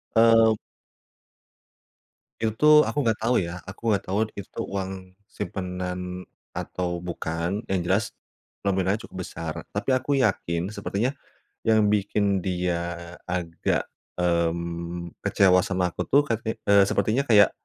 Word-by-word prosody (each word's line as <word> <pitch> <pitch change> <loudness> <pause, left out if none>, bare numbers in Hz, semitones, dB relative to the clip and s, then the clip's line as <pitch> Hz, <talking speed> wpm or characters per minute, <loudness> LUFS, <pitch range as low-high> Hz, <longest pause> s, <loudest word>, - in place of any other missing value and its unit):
Eee. 115 -1 +6 1.9
Itu 110 - +1
tuh 150 0 +8
aku - - -4
enggak 110 -2 +1
tahu 120 +2 +2
ya. 85 - -5 0.2
Aku 95 - -10
enggak 100 - 0
tahu 95 - 0 0.2
itu 100 - -7
tuh - - -2
uang 95 -1 -2 0.5
simpanan 90 -1 -4 0.3
atau 90 -1 -3
bukan, 85 +4 -2
yang 95 - +1
jelas 95 +4 +2 0.6
nominalnya 95 +2 +1
cukup - - -11
besar. 80 -2 -5 0.2
Tapi 105 +6 -3
aku 130 +3 -4
yakin 90 -1 -1
sepertinya 105 +5 -1 0.5
yang 110 -1 +5
bikin 105 0 +1 0.2
dia 90 -1 0 0.5
agak, 85 -2 -1 0.4
mmm, 85 0 -1
kecewa 90 -2 +5
sama 90 -2 0
aku - - -5
tuh 145 - +7
kayak, 115 -2 -1 0.3
eee, 100 -1 +7
sepertinya 125 +6 +1
kayak 105 -3 +7
95 Hz, 130 wpm, -25 LUFS, 90-110 Hz, 1.9 s, tuh